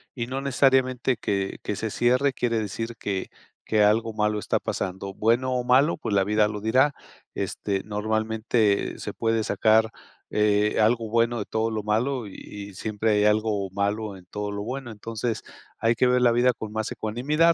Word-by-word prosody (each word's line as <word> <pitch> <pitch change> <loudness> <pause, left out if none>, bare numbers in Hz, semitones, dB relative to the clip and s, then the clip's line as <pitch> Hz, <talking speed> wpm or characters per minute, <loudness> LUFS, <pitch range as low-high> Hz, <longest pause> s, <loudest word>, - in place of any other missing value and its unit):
y 120 -3 -3
no 130 +2 -3
necesariamente 130 -2 +2
que 100 -3 -2
que 105 - -3
se 110 - -2
cierre 130 +5 +2
quiere 115 -3 0
decir 115 +2 -4
que 95 -3 -3 0.4
que 110 -1 +3
algo 110 +2 +2
malo 105 0 0
está - - 0
pasando, 95 +1 -4
bueno 120 +5 +1
o 125 -1 0
malo, 130 +6 +4
pues, 105 -9 -2
la 95 - +4
vida 105 +1 +2
lo 105 -1 -5
dirá, 130 +7 +3 0.4
este, 100 -2 -2
normalmente 110 0 0
se - - -6
puede 115 -1 0
sacar, 110 +1 +3 0.4
eh, 105 0 +2
algo 115 +1 +2
bueno 115 +1 +2
de 105 - -3
todo 110 +1 -1
lo 110 -1 -3
malo 120 +4 0
y 100 - -11
y 100 -1 -9
siempre 110 +2 -1
hay 105 0 +3
algo 105 -2 +1
malo 100 0 -2
en 90 - -16
todo 105 +2 -4
lo 100 0 -4
bueno, 130 +2 -5
entonces 110 +1 -4 0.3
hay 115 +1 +2
que 125 - +3
ver 125 0 +3
la 120 - +5
vida 125 +2 +3
con 110 -2 -7
más 110 +1 -3
ecuanimidad, 130 +9 +2
110 Hz, 185 wpm, -25 LUFS, 105-120 Hz, 0.4 s, la